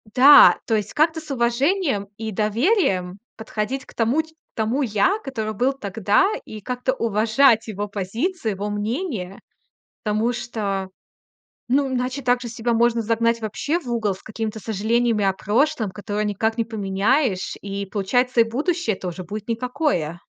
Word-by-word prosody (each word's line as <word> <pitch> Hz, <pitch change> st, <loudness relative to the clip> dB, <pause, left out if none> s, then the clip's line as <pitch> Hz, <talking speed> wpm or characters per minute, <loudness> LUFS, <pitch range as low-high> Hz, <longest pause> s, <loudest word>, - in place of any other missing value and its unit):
Да, 275 Hz, +3 st, +8 dB
то 225 Hz, -, +1 dB
есть 210 Hz, -1 st, -2 dB
как-то 320 Hz, +2 st, +2 dB
с 310 Hz, -2 st, -10 dB
уважением 260 Hz, -, +1 dB
и 220 Hz, -1 st, -4 dB
доверием 210 Hz, -, +1 dB, 0.2 s
подходить 220 Hz, +4 st, -4 dB
к -, -, -16 dB
тому 235 Hz, +7 st, +2 dB
ть 320 Hz, 0 st, -19 dB
к 320 Hz, -, -52 dB
тому 230 Hz, +6 st, 0 dB
я, 225 Hz, -, +2 dB
который 220 Hz, -6 st, -3 dB
был 255 Hz, +6 st, +1 dB
тогда, 210 Hz, -, +1 dB, 0.2 s
и 215 Hz, -1 st, -9 dB
как-то 250 Hz, +3 st, -2 dB
уважать 230 Hz, +1 st, +3 dB
его 205 Hz, -1 st, -4 dB
позиции, 220 Hz, -, -2 dB
его 200 Hz, +1 st, -4 dB
мнение. 210 Hz, -, -3 dB, 0.6 s
Потому 215 Hz, +3 st, 0 dB
что, 200 Hz, -5 st, -3 dB, 0.8 s
ну, 275 Hz, +2 st, +3 dB
иначе 255 Hz, +1 st, -2 dB
так 245 Hz, -1 st, +2 dB
же 240 Hz, -, -5 dB
себя 230 Hz, +1 st, -1 dB
можно 235 Hz, 0 st, +2 dB
загнать 230 Hz, +1 st, +1 dB
вообще 260 Hz, +10 st, -2 dB
в 260 Hz, -, -14 dB
угол 225 Hz, -4 st, 0 dB
с 190 Hz, -, -13 dB
какими-то 220 Hz, 0 st, -5 dB
сожалениями 220 Hz, +1 st, 0 dB
о 195 Hz, -, +3 dB
прошлом, 220 Hz, +2 st, 0 dB
которые 210 Hz, +1 st, -3 dB
никак 220 Hz, +2 st, -1 dB
не 230 Hz, -, 0 dB
поменяешь. 205 Hz, +1 st, 0 dB
И 200 Hz, 0 st, -4 dB
получается, 235 Hz, +5 st, +1 dB
и -, -, +7 dB
будущее 280 Hz, -, -1 dB
тоже 185 Hz, 0 st, -6 dB
будет 210 Hz, +4 st, -7 dB
никакое. 230 Hz, -, -1 dB
225 Hz, 155 wpm, -22 LUFS, 205-255 Hz, 0.8 s, Да